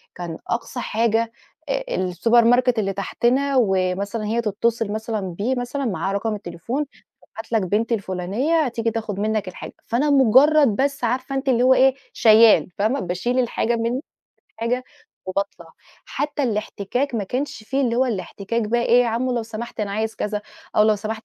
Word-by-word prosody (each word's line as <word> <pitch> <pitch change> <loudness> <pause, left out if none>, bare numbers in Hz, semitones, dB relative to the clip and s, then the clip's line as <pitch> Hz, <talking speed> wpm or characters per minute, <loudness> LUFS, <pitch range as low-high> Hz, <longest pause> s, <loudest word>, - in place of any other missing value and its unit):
كان 170 -2 -6
أقصى 240 +1 -3
حاجة، 230 0 0 0.4
آآ، - - 0 0.3
الSupermarket 240 +5 +4
اللي 195 -2 0
تحْتنا، 255 +8 0
ومثلًا 200 +1 0
هي 230 +3 0
تتّصل 225 0 -1
مثلًا 220 0 -3
بيه 200 +8 -2
مثلًا 250 +3 -3
معاه 195 -2 -1
رقم 215 +1 -1
التليفون 205 - -4 0.4
هابعت 225 +1 -11
لك 220 -2 +2
بنتي 230 +2 +2
الفلانية 205 - 0
هتيجي 230 -2 -1
تاخد 215 -3 -4
منّك 215 -2 -1
الحاجة، 180 - -8
فأنا 275 +6 +1
مجرد 280 +3 +6
بس 275 0 -1
عارفة 255 +3 -1
أنتِ 270 0 -1
اللي 245 -1 +3
هو 260 +1 +6
إيه؟ 265 0 +5 0.2
شيال 220 -2 +6
فاهمة؟ 220 +7 +1
باشيل 185 +8 -1
الحاجة 235 -1 0
من 235 +3 -1 0.5
الحاجة، 240 +3 -2 0.4
وباطلع 185 -3 -4 0.3
حتى 290 0 -2
الاحتكاك 230 +3 -2
ما 210 - -1
كانش 250 +1 -4
فيه 270 +5 -1
اللي 235 -3 +1
هو 260 +1 +3
الاحتكاك 205 +1 -3
بقى 235 +3 0
إيه 240 +1 +5
يا 240 - 0
عمّو 245 +3 -1
لو 230 - -1
سمحت 225 +1 -7
أنا 200 -1 -2
عايز 220 +2 -2
كذا، 210 0 -3 0.3
أو 210 - +6
لو 215 -1 +4
سمحت 215 +2 -5
230 Hz, 165 wpm, -22 LUFS, 210-250 Hz, 0.5 s, مجرد